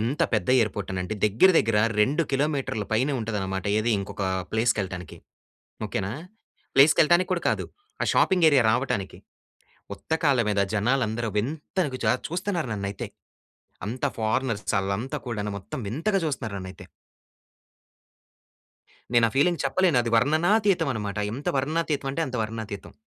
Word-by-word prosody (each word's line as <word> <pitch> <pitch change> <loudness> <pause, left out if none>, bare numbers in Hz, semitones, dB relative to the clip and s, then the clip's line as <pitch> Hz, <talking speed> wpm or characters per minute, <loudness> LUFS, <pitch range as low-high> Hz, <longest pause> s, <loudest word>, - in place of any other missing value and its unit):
ఎంత 125 +7 0
పెద్ద - - -1
ఎయిర్పోర్టనంటే, 95 -2 -2
దగ్గర 110 - +5
దగ్గర 110 -1 +2 0.2
2 145 +10 +3
కిలోమీటర్ల 135 -6 0
పైనే 130 +6 +2
ఉంటదనమాట. 95 -4 -3
ఏది 115 +2 0
ఇంకొక 100 0 -6 0.3
ప్లేస్‌కేళ్ళటానికి. 100 -7 -1 0.7
ఓకే - - -2
నా! 100 - -4 0.6
ప్లేస్‌కేళ్ళటానికి 160 +6 +5
కూడా 175 - -1
కాదు. - - -2 0.4
ఆ - - +3
షాపింగ్ 180 -4 +4
ఏరియా 135 -5 +4
రావటానికి. 110 -6 -1 0.8
ఉత్తకాల్ల 145 -6 +1
మీద, 100 -1 +1
జనాలందరూ 115 0 0
వింతగా 145 - -2
జా - - +4 0.2
చూస్తున్నారు 175 - -2
నన్నైతే. 100 -1 -4 0.8
అంతా 125 +4 -1
ఫారనర్స్ 110 0 -1
ఆల్లంతా 110 +10 -3
కూడాను, 105 -3 -3
మొత్తం 130 +9 -7
వింతగా 190 - 0
చూస్తున్నారు 125 -9 -3
నన్నైతే. 95 -1 -9 2.3
నేను 120 -1 +6
ఆ - - -9
ఫీలింగ్ 175 +4 +3
చెప్పలేను. 170 -1 +2
అది 115 - -3
వర్ణనాతీతం 170 - +3
అన్నమాట. 105 -2 -4 0.2
ఎంత 140 - -4
వర్ణనాతీతం 150 -1 -1
అంటే, 165 - -3
అంత 125 -2 -4
వర్ణనాతీతం. 110 -3 -6
120 Hz, 125 wpm, -25 LUFS, 105-150 Hz, 2.3 s, నేను